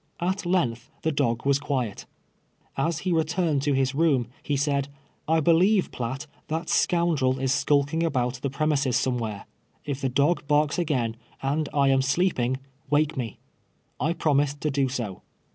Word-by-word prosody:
At 185 +1 -1
length 120 -11 0
the 160 - +1
dog 125 -5 0
was 140 0 +3
quiet. 125 -8 -3 0.7
Ashe 160 +4 -1
returned 165 -3 +1
to 145 0 +1
his 135 0 +1
room, 140 -6 +2
he 145 - -1
said, 140 -1 0 0.2
" - - -37
I 160 +1 +3
believe, 180 +6 +3
Piatt, 130 +3 -4 0.2
that 165 +2 -3
scoundrel 160 -7 +2
is 135 0 +1
skulking 145 +3 +2
about 130 -6 0
the 140 - -1
premises 140 -2 +1
si 130 - +1
miewhere. 110 -5 -3 0.4
If 140 -2 -3
the 135 - 0
dug 140 +4 +1
barks 150 +2 +2
again, 125 -9 0 0.3
and 145 +3 0
I 140 -1 +3
am 135 0 +4
slee}>ing, 135 -3 +1 0.3
wake 155 +2 +2
me."' 120 -5 -4 0.6
I 155 +6 +1
promised 145 -3 +1
to 150 - 0
do 135 -1 +1
so. 120 -7 -4
140 Hz, 160 wpm, -26 LUFS, 130-160 Hz, 0.7 s, am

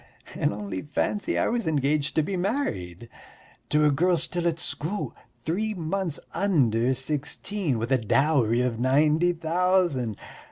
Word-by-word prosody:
And - - 0
only 100 -2 -5
fancy, 195 +7 -1
I - - +2
was 235 -4 -1
engaged 150 -1 +1
to 155 - +3
be 195 +4 -3
married 120 - -2 0.6
to 150 0 +3
a 150 - +5
girl 175 +5 +2
still 175 +1 0
at 165 -1 0
school, 155 - -3 0.2
three 185 - -2
months 170 -1 -2
under 130 - +2
sixteen, 150 - -2
with 115 +3 -3
a 130 - +4
dowry 120 0 +2
of 125 -2 -1
ninety 150 +7 +3
thousand. 170 - +1
150 Hz, 145 wpm, -26 LUFS, 125-175 Hz, 0.6 s, a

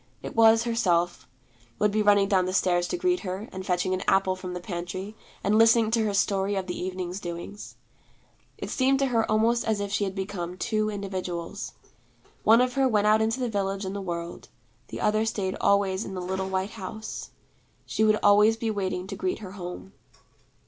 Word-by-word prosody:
It - - -7
was 225 0 +6
Herself, 175 -7 0 0.5
would 210 - +2
be 215 +1 +1
running 205 -1 +4
down 190 -3 +2
the 185 - -2
stairs 175 -2 +2
to - - -2
greet 360 0 +1
her, 190 +3 -5
and 190 0 -6
fetching 185 0 0
an 185 - -1
apple 190 -1 +3
from 185 -1 -6
the - - -3
pantry, 180 +3 -5 0.3
and 210 +2 +3
listening 225 -1 +5
to 225 -1 +2
her 205 - -1
story 195 0 +1
of 190 -1 -2
the 180 - -4
evening's 185 0 -4
doings. 175 +3 -7 0.8
It - - -6
seemed 270 +1 +2
to 275 - +1
her 225 -1 +2
almost 225 +2 +2
as 220 -2 0
if 200 0 -3
she 205 - +1
had 190 0 -4
become 185 -3 -4
two 215 0 0
individuals. 185 -4 -5 0.7
One 225 +2 +6
of 250 0 +1
her 270 0 +3
went 210 -4 +2
out 215 +1 +4
into 225 +3 0
the 250 - 0
village 195 -2 -2
and 190 +1 -4
the 200 - -3
world. 170 -2 -6 0.4
The - - -7
other 215 +1 +2
stayed 200 -4 -2
always 200 0 +2
in 195 - -7
the - - -3
little 190 +1 -3
white 190 +1 -1
house. 220 +1 -7 0.6
She 220 - 0
would 215 0 +4
always 210 +2 +5
be 225 -1 -1
waiting 185 -3 -2
to 195 +1 -6
greet 185 -1 -2
her 195 -4 -9
home. 190 0 -8
200 Hz, 200 wpm, -26 LUFS, 185-220 Hz, 0.8 s, was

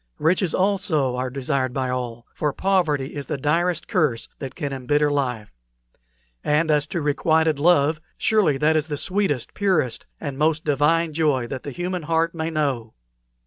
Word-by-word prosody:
Riches 175 +2 +2
also 185 -9 +1
are 130 +1 -2
desired 130 -1 -1
by 130 -2 -1
all, 120 -2 -4
for 150 - -1
poverty 160 -8 +1
is 140 -2 -5
the 150 - -2
direst 165 +4 0
curse 150 - 0
that 135 -2 -6
can 145 -5 -3
embitter 145 +3 +1
life; 125 -7 -2 0.9
and 155 +2 +2
as 150 0 +2
to 170 -2 -3
requited 155 +1 +2
love, 155 -1 +3 0.2
surely 210 -11 +2
that 155 +3 +3
is 155 -1 +1
the 150 -2 -3
sweetest, 185 - -1
purest, 185 - 0
and 140 -3 -5
most 155 0 +1
divine 155 +3 +2
joy 145 -6 +1
that 130 +2 -5
the - - -6
human 180 +5 -3
heart 165 +1 0
may 160 -1 -2
know." 140 -8 -2
150 Hz, 165 wpm, -23 LUFS, 135-165 Hz, 0.9 s, love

